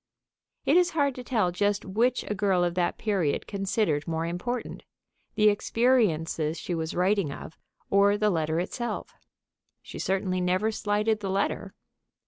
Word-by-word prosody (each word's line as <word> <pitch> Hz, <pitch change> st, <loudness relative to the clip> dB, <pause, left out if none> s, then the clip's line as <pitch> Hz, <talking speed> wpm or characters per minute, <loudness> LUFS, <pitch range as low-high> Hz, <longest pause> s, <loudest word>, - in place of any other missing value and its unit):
It -, -, +4 dB
is 355 Hz, -1 st, +4 dB
hard 280 Hz, -2 st, +2 dB
to 250 Hz, -, -8 dB
tell 220 Hz, -8 st, +1 dB
just 205 Hz, +3 st, 0 dB
which 230 Hz, +6 st, +1 dB
a -, -, -1 dB
girl 190 Hz, -3 st, +2 dB
of 175 Hz, -1 st, 0 dB
that 175 Hz, -1 st, 0 dB
period 195 Hz, -9 st, 0 dB
considered 195 Hz, -6 st, -1 dB
more 165 Hz, 0 st, -1 dB
important, 225 Hz, +9 st, -4 dB, 0.5 s
the 215 Hz, -1 st, +4 dB
experiences 200 Hz, -9 st, +1 dB
she 175 Hz, -, -4 dB
was 160 Hz, -1 st, -3 dB
writing 185 Hz, -3 st, +1 dB
of 155 Hz, -, -9 dB, 0.4 s
or 200 Hz, +1 st, +4 dB
the 210 Hz, 0 st, +2 dB
letter 160 Hz, -1 st, 0 dB
itself. 235 Hz, +7 st, -4 dB, 0.7 s
She -, -, -9 dB
certainly 190 Hz, -1 st, 0 dB
never 185 Hz, +5 st, +1 dB
slighted 210 Hz, +1 st, 0 dB
the 200 Hz, -2 st, -4 dB
letter. 195 Hz, +1 st, -1 dB
195 Hz, 150 wpm, -27 LUFS, 175-215 Hz, 0.7 s, It